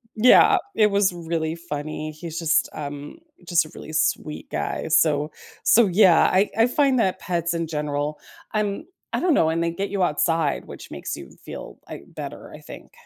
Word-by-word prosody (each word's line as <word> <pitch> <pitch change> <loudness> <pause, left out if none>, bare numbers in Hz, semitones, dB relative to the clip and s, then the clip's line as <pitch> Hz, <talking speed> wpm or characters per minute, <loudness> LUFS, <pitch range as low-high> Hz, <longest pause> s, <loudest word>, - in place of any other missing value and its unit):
Yeah, 235 +3 +6 0.2
it 210 -1 +4
was 200 -2 +2
really 165 -1 -3
funny. 155 -1 -5
He's 165 +1 -7
just, 165 -1 +2
um, 145 - -7 0.3
just 175 -2 +3
a - - -13
really 155 - -9
sweet 155 -1 -1
guy. - - -3
So 155 -1 +3 0.3
so, 230 -2 +5
yeah, 185 -1 +5
I 195 +3 +3
I 225 +2 +5
find 270 -1 +2
that 190 -3 +1
pets 170 -1 -1
in 165 -1 -2
general 150 -1 -3 0.3
I'm 210 +6 -1 0.3
I - - +1
don't 350 -3 +2
know, 160 - +3
and 165 +1 0
they 170 - 0
get 195 +4 -4
you 195 -2 0
outside, 165 -2 0
which - - -11
makes - - -5
you 65 - -11
feel, - - -9
I - - -8
better, - - -8
I - - -10
think. - - -12
170 Hz, 185 wpm, -23 LUFS, 155-200 Hz, 0.3 s, Yeah